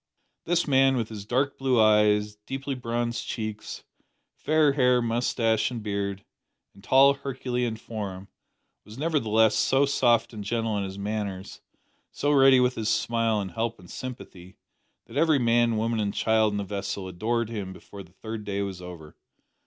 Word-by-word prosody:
This 175 0 +1
man, 135 -1 +4
with 115 -3 -2
his 105 -2 -8
dark 135 +4 0
blue 130 -3 +2
eyes, 105 -1 +3
deeply 135 +1 -4
bronzed 120 -1 -3
cheeks, 110 -2 -5 0.5
fair 155 -2 +2
hair, 125 -3 +3
moustache, 115 -1 0
and 120 -3 -6
beard, 100 -1 -3 0.5
and 100 - -18
tall 135 +1 +6
herculean 125 -4 -3
form, 100 -4 -7 0.6
was 110 +2 -13
nevertheless 110 -8 +2
so 135 +5 +3
soft 120 -4 +2
and 105 -2 -6
gentle 115 +1 -1
in 100 - -2
his 95 0 -7
manners, 100 -2 -5 0.5
so 145 - -1
ready 135 -2 +6
with 125 0 +2
his 110 -2 -2
smile 115 -2 +1
and 95 -2 -4
help 115 +4 -2
and 90 -2 -15
sympathy, 95 -8 -9 0.5
that - - -9
every 160 -3 +4
man, 120 -2 +2
woman, 115 +1 0
and 100 -1 -2
child 110 -1 +2
in 105 - -3
the 100 - -2
vessel 100 -1 -4
adored 110 +5 -2
him 100 -4 -5
before 100 +1 -11
the 90 -2 -15
third 110 +3 -7
day 100 -1 -2
was 95 -2 -6
over. 85 -4 -10
110 Hz, 165 wpm, -26 LUFS, 100-125 Hz, 0.6 s, tall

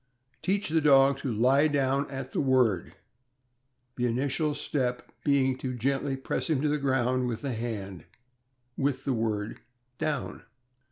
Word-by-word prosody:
Teach 200 0 0
the 160 +1 +2
dog 135 -2 +5
to 130 - -2
lie 130 +7 +4
down 140 -1 +1
at 135 -1 -6
the - - +1
word, 125 - +2 1.0
the 125 0 +1
initial 140 +5 0
step 125 -4 -2
being 135 -3 +3
to 130 -1 -3
gently 135 +3 -1
press 135 - -2
him 155 -4 +2
to - - +3
the 150 0 +1
ground 130 -2 +1
with 115 -2 -3
the 135 -3 -2
hand, 100 -7 -5 0.7
with 135 -1 -1
the 135 - +1
word 110 -2 -2 0.4
"down." 155 -4 -2
135 Hz, 150 wpm, -28 LUFS, 125-140 Hz, 1.0 s, dog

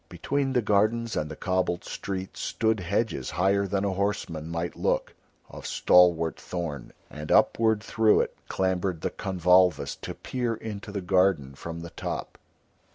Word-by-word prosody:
Between 135 +10 -1
the 125 -3 +2
gardens 110 +3 +1
and 75 - -1
the 80 - -6
cobbled 90 0 -1
streets 95 -1 -5
stood 110 -1 0
hedges 95 - -1
higher 100 +2 +1
than 100 +1 -1
a 100 - 0
horseman 95 -5 -2
might 85 +1 -3
look, - - -1 0.3
of - - -9
stalwart 85 -3 +4
thorn, 80 -8 -5 0.2
and 75 +1 -6
upward 110 -2 +3
through 110 -1 +3
it - - -4
clambered 95 -2 -1
the - - -2
convolvulus 90 -2 +2
to - - -6
peer 120 -3 -2
into 105 -2 -7
the 100 -1 -3
garden 90 -7 +2
from 85 +4 -7
the 85 0 -8
top. - - -5
95 Hz, 155 wpm, -27 LUFS, 85-105 Hz, 0.3 s, stalwart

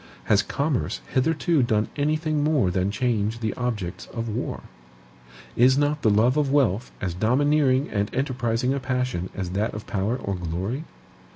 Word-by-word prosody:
Has 105 -2 +3
commerce 140 +5 -1
hitherto 160 +3 +2
done 110 -3 +1
anything 155 +1 0
more 145 - +2
than 95 +2 0
change 110 -1 0
the 110 -2 -1
objects 105 -8 -4
of 115 0 -5
war? 110 +3 -3 0.9
Is 130 +3 +5
not 145 +1 +1
the 110 - +3
love 115 +6 +3
of 145 -3 +1
wealth 125 -6 +2
as 90 -3 -2
domineering 135 - +2
and 100 0 0
enterprising 125 -2 0
a 140 - -1
passion 125 -8 -2
as 90 -2 -3
that 105 +4 -1
of 105 - -6
power 105 +5 -1
or 100 -6 -3
glory? 95 - -3
120 Hz, 160 wpm, -25 LUFS, 105-140 Hz, 0.9 s, Is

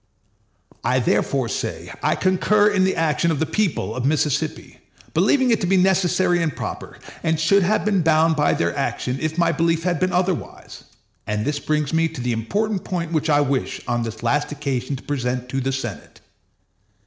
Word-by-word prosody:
I - - +2
therefore - - +1
say - - -4
I - - +2
concur 205 +3 +3
in 190 -2 +2
the 190 - +1
action 165 +1 +1
of 160 -4 0
the 160 - +1
people 155 - -1
of 130 - -3
Mississippi, 150 +1 -1 0.3
believing 260 -3 +3
it 225 - +2
to 180 - 0
be 190 +1 +3
necessary 185 -1 +2
and 160 -4 -1
proper, - - -6 0.2
and 160 -1 0
should 200 +5 +4
have 205 +4 +1
been 200 -3 +2
bound 160 0 +3
by 150 -1 +2
their 85 0 -1
action 125 +1 -2
if 155 +1 -2
my 170 -1 +3
belief 165 +1 +1
had 175 -3 0
been 185 0 +1
otherwise; 180 -1 -3 0.4
and 105 +1 -1
this 145 -1 -1
brings 150 0 -1
me 165 0 +3
to 160 -3 -9
the 120 0 -1
important 200 - -1
point 170 -3 -3
which 155 0 0
I 145 -1 +4
wish 140 -2 -1
on 120 -1 0
this 115 -1 -6
last 145 +5 0
occasion 140 -2 -3
to 135 - -10
present 125 -3 -3
to 135 +1 -2
the 135 +1 -1
Senate. 120 -7 -6
155 Hz, 190 wpm, -22 LUFS, 135-180 Hz, 0.4 s, should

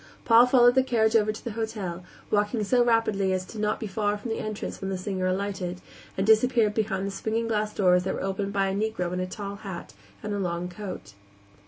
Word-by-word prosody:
Paul 235 +1 +7
followed 245 -1 +6
the 260 - +5
carriage 225 -4 +2
over 215 -1 +4
to 215 - -10
the 235 - -4
hotel, 205 -5 -4 0.3
walking 210 +2 +1
so 245 +4 +3
rapidly 215 -5 +2
as 185 +2 -4
not 210 -1 +1
to - - -16
be - - -2
far 205 +1 -1
from 225 +3 -6
the 225 - -2
entrance 215 -1 -5
when 195 - -3
the 190 - -2
singer 185 0 -2
alighted, 185 -1 -2 0.4
and 190 - +1
disappeared 220 0 +4
behind 205 -3 -1
the 200 - -3
swinging 225 +3 -2
glass 215 -1 0
doors 180 -3 +3
that - - -1
were - - -4
opened 195 +1 -2
by 195 -1 +1
a - - -2
Negro 200 -4 -1
in 180 - -2
a 185 - -2
tall 200 +1 -6
hat 195 -4 -8 0.3
and 210 - -3
a 205 - -2
long 175 -1 -2
coat. 185 - -8
205 Hz, 225 wpm, -26 LUFS, 190-220 Hz, 0.4 s, Paul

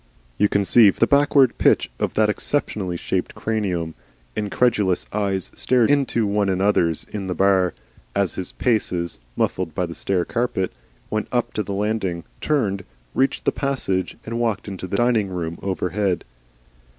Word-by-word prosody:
You 105 - +4
conceive 100 +1 +5
the - - +5
backward 140 -1 +4
pitch - - +3
of - - -1
that 110 0 +4
exceptionally 105 -6 -1
shaped - - -2
cranium? 95 -7 -2 0.4
Incredulous 105 -2 +1
eyes 100 -3 -1
stared 125 -1 +3
into 135 -6 +2
one 100 0 +1
another's 95 -4 +2
in 100 -3 -4
the 90 - -2
bar, 95 -1 +3 0.4
as 100 -3 +1
his 95 - -4
paces, 90 -8 0 0.2
muffled 85 -4 -1
by 90 - 0
the 85 - -7
stair 90 0 0
carpet, 115 -6 -1 0.4
went 110 0 -1
up 120 -1 0
to - - -1
the 100 - -4
landing, 100 -5 -1 0.2
turned, 105 -10 0 0.3
reached 135 +1 +1
the - - +4
passage 130 -10 -1
and 115 +1 -3
walked 110 -4 -1
into 95 -2 -5
the 100 +2 -2
dining 115 -4 +2
room 85 -2 -4
overhead. 95 0 -1
100 Hz, 150 wpm, -22 LUFS, 95-115 Hz, 0.4 s, conceive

